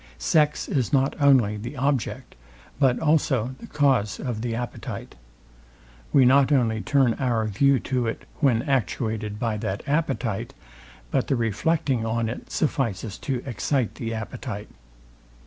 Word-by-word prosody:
Sex 150 - +2
is 130 -2 0
not 135 -1 +2
only 125 -7 +4
the 120 +6 -7
object, 135 -4 -1 0.5
but 130 -3 +4
also 135 -6 +1
the - - -10
cause 130 -9 +1
of 120 -4 -3
the 115 -1 -2
appetite. 120 +1 -6 1.0
We 135 - +6
not 135 +2 +5
only 115 -6 +2
turn 135 -3 +3
our 120 -5 +1
view 130 +6 +3
to 125 -3 -1
it, 110 - -4 0.2
when 125 -6 +3
actuated 110 -6 -1
by 110 -1 -1
that 105 -1 -3
appetite; 140 -8 -1 0.6
but - - +1
the 135 - +2
reflecting 120 +3 0
on 115 0 -1
it 115 - -7
suffices 115 -9 -1
to 130 -3 -3
excite 130 -1 -1
the 115 -1 -5
appetite. 110 -1 -5
125 Hz, 140 wpm, -25 LUFS, 110-140 Hz, 1.0 s, We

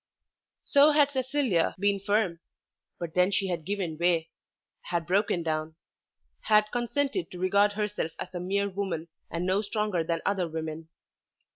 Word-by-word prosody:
So 285 +2 +6
had 290 -1 +4
Cecilia 260 - +1
been 200 +1 +1
firm; 200 -3 0 0.6
but 170 -2 -5
then 180 +1 +4
she 195 -1 0
had 170 -3 -3
given 185 -5 -3
way, 170 -2 +2 0.6
had 170 -1 -1
broken 185 -1 +1
down, 155 0 -2 0.7
had 210 -1 +4
consented 280 +8 -1
to 180 - -9
regard 200 +3 +3
herself 210 -6 -2
as - - -7
a 175 - -3
mere 200 +3 0
woman 185 -4 -3 0.2
and 170 +1 -3
no 190 +2 +2
stronger 210 -4 -1
than 165 0 -2
other 190 -3 +1
women. 160 0 -5
190 Hz, 150 wpm, -28 LUFS, 170-210 Hz, 0.7 s, So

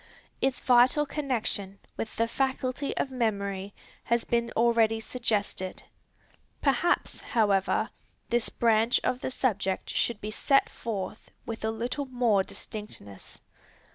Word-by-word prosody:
Its 265 -1 +1
vital 255 +3 +5
connection 240 -9 -2 0.2
with 220 - -5
the 230 - +1
faculty 265 +2 -1
of 265 - -1
memory 200 -5 -1 0.3
has 235 0 +2
been 235 0 +1
already 225 -1 +4
suggested. 210 -5 -2 0.8
Perhaps, 295 +5 +1
however, 200 -4 +1 0.4
this 240 -1 +2
branch 230 +1 +3
of 250 - 0
the - - -2
subject 200 -7 -1
should 235 -3 0
be 210 0 -5
set 275 +5 +3
forth 215 -1 -5 0.2
with 225 -1 -5
a 220 - +1
little 240 +6 -2
more 240 -6 +3
distinctness. 190 - -8
230 Hz, 120 wpm, -28 LUFS, 210-255 Hz, 0.8 s, vital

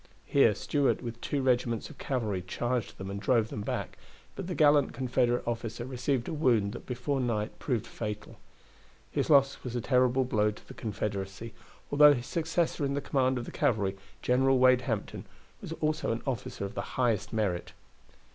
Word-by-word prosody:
Here 115 -7 +4
Stuart 140 +6 0
with 120 0 -6
two 140 -2 -1
regiments 120 -3 +1
of - - -15
cavalry 110 -8 -1
charged 120 +6 -2
them 95 0 -6
and 100 - -4
drove 110 +1 +2
them 105 - -5
back, - - -4 0.4
but - - -5
the 180 - -3
gallant 145 -2 +4
Confederate 125 -1 0
officer 115 0 -3
received 130 0 -1
a - - -3
wound 120 -10 +2
that - - -9
before 130 +3 -1
night 110 -4 -2
proved 120 -5 -1
fatal. 105 -1 -6 0.7
His - - -1
loss 140 -2 +4
was 125 -1 -5
a - - +1
terrible 125 +1 +3
blow 105 -3 +2
to 105 - -10
the - - -10
Confederacy, 105 0 -4 0.4
although 145 0 +8
his 120 -1 -5
successor 160 0 -1
in 140 0 0
the - - 0
command 130 -2 +1
of 120 - -4
the - - -7
cavalry, 105 -9 +1 0.3
General 130 +1 +3
Wade 130 0 +5
Hampton, 110 -3 -3 0.4
was - - -7
also 155 -4 -1
an 115 - -3
officer 125 -6 -3
of 100 - -6
the - - -2 0.2
highest 110 -5 +1
merit. 100 -6 -1
120 Hz, 180 wpm, -29 LUFS, 110-135 Hz, 0.7 s, although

